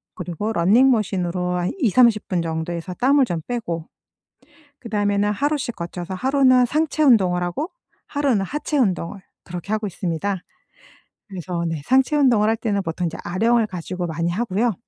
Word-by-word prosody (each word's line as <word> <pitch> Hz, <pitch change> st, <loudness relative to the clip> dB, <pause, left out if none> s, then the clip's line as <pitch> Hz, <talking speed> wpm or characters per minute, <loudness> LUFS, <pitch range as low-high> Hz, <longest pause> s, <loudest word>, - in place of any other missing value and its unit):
그리고 180 Hz, +4 st, -4 dB
러닝머신으로 185 Hz, -4 st, +2 dB
한 175 Hz, 0 st, -1 dB
20-30 235 Hz, -, +3 dB
분 180 Hz, -3 st, 0 dB
정도 160 Hz, +1 st, -3 dB
해서 170 Hz, +2 st, -6 dB
땀을 270 Hz, +4 st, +3 dB
좀 170 Hz, -8 st, -3 dB
빼고 170 Hz, -10 st, -4 dB, 0.9 s
그다음에는 205 Hz, -2 st, 0 dB
하루씩 280 Hz, +1 st, -1 dB
거쳐서 175 Hz, +1 st, -6 dB
하루는 255 Hz, +3 st, +4 dB
상체 310 Hz, +3 st, 0 dB
운동을 190 Hz, -10 st, +4 dB
하고 175 Hz, -, -3 dB, 0.4 s
하루는 280 Hz, -8 st, +1 dB
하체 295 Hz, -, -3 dB
운동을 195 Hz, -5 st, 0 dB, 0.2 s
그렇게 175 Hz, +3 st, -7 dB
하고 215 Hz, -1 st, -1 dB
있습니다. 190 Hz, +1 st, -2 dB, 0.9 s
그래서 180 Hz, -3 st, -4 dB
네 165 Hz, -3 st, -3 dB
상체 265 Hz, +3 st, +3 dB
운동을 235 Hz, -7 st, +4 dB
할 225 Hz, -, +2 dB
때는 205 Hz, -3 st, -1 dB
보통 165 Hz, +1 st, -3 dB
인제 165 Hz, -, -6 dB
아령을 225 Hz, +5 st, +2 dB
가지고 180 Hz, -1 st, -5 dB
많이 170 Hz, +1 st, -2 dB
하고요. 220 Hz, +4 st, 0 dB
200 Hz, 345 characters per minute, -22 LUFS, 175-245 Hz, 0.9 s, 하루는